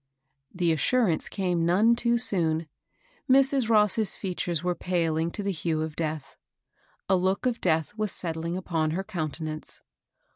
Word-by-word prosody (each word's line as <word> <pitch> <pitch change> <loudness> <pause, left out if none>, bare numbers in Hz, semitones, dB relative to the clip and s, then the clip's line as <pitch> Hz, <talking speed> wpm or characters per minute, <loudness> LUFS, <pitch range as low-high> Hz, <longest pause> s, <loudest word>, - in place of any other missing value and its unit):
The 175 -2 +1
assurance 175 - +1
came 180 -4 -1
none 205 +8 +4
too 235 0 +1
soon; 165 -8 +1 0.6
Mrs. 270 -2 +4
Ross's 210 -1 +3
features 175 -3 -3
were 180 0 +1
paling 165 -2 0
to 205 - -5
the 200 - 0
hue 160 -2 -1
of 160 -1 -5
death; 155 -4 -4 0.7
a 190 - +4
look 190 +5 0
of 245 -2 0
death 160 0 +1
was 215 -2 -2
settUng 165 0 -3
upon 165 -4 -1
her 190 - -2
countenance. 155 -5 -4
180 Hz, 145 wpm, -27 LUFS, 160-210 Hz, 0.7 s, none